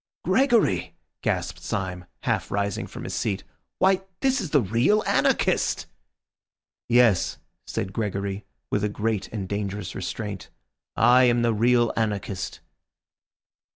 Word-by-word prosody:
"Gregory!" 100 - +2 0.3
gasped - - -2
Syme, 90 -3 -3 0.2
half - - 0
rising 100 -1 -1
from - - -8
his - - -5
seat. 100 -3 -1 0.3
"Why, 190 0 +3 0.2
this 265 -2 +2
is 180 - -4
the 145 - +4
real 120 - +2
anarchist!" - - +2 1.0
"Yes," 120 -5 +4 0.3
said 95 -1 -3
Gregory, 100 -2 -2 0.3
with 105 - +1
a 105 - +1
great 105 -1 -1
and 100 -4 -5
dangerous 100 -1 -3
restraint, 100 +1 -5 0.5
"I 125 +1 +6
am 120 -1 +3
the 115 -1 +3
real 120 +1 +3
anarchist." 105 -4 -2
105 Hz, 120 wpm, -25 LUFS, 100-120 Hz, 1.0 s, I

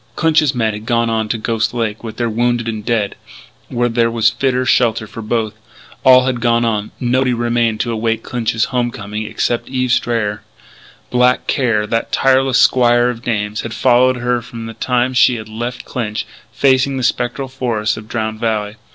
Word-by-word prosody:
Clinch's 155 -4 +2
men 110 -3 0
had 105 +2 -8
gone 115 -1 +1
on 110 -1 -1
to 115 - 0
Ghost 115 +1 -1
Lake 110 -2 -2
with 110 -2 -7
their 120 - 0
wounded 120 +1 0
and 110 -2 -4
dead, 110 -3 0 0.6
where 120 -1 0
there 115 0 +1
was 115 -1 +2
fitter 130 -1 0
shelter 115 -3 +2
for 110 +2 -9
both. 110 -1 -1 0.5
All 130 -1 +7
had 125 -2 -1
gone 120 0 +2
on; 105 -2 -1
nobody 125 0 +1
remained 115 -2 0
to 120 - -2
await 115 0 -1
Clinch's 115 -1 -1
home 120 -1 +1
coming 105 -1 -6
except 120 - -2
Eve 130 -1 -1
Strayer. 110 -4 0 0.7
Black 125 0 +3
Care, 115 -6 +1
that 115 +2 -2
tireless 135 -1 +3
squire 120 -1 +4
of 115 -1 -9
dames, 105 -3 -2
had 115 0 -6
followed 130 0 +3
her 120 0 0
from 115 0 -8
the 115 - -7
time 125 +2 0
she 125 0 +4
had 110 -2 -7
left 120 +3 -5
Clinch, 110 -4 -3 0.3
facing 135 0 +2
the 130 - -3
spectral 120 +3 -1
forests 120 -5 -1
of 110 0 -10
Drowned 110 -1 -3
Valley. 110 -2 -2
120 Hz, 185 wpm, -17 LUFS, 110-125 Hz, 0.7 s, All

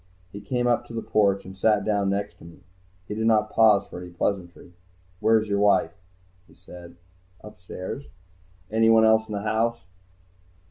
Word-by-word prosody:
He 100 - -9
came 125 +1 -2
up 120 0 0
to 115 - -9
the 115 - -4
porch 100 -2 +1
and 95 0 -10
sat 105 +1 +1
down 100 -2 0
next 100 +1 -3
to - - -16
me. 85 +2 -15 0.4
He - - -5
did 110 +1 -1
not 110 -1 +2
pause 110 -3 +4
for 90 - -10
any 90 - -9
pleasantries. 85 0 -4 0.5
"Where's 110 0 +2
your 100 0 -1
wife?" 105 0 +3 0.6
he - - -22
said. 85 -1 -13 0.5
"Upstairs." 95 +5 -8 0.7
"Anyone 110 0 +4
else 110 0 +3
in - - -5
the 100 - -4
house?" 115 +2 -1
105 Hz, 170 wpm, -24 LUFS, 95-110 Hz, 0.7 s, pause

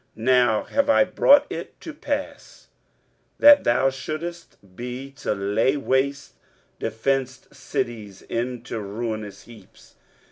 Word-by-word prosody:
now 120 -1 +2
have 280 0 0
I 275 - +6
brought 285 +1 +5
it - - -7
to 320 - -8
pass, 290 -1 -6 0.7
that 290 0 +7
thou 130 +3 +3
shouldest 155 +6 -7 0.2
be 125 +4 -7
to 105 - -2
lay 105 +8 +1
waste 135 0 -1 0.5
defenced 130 +2 -2
cities 105 -5 -5
into 120 -1 -4
ruinous 105 -1 -5
heaps. 110 -5 -18
125 Hz, 110 wpm, -23 LUFS, 110-140 Hz, 0.7 s, that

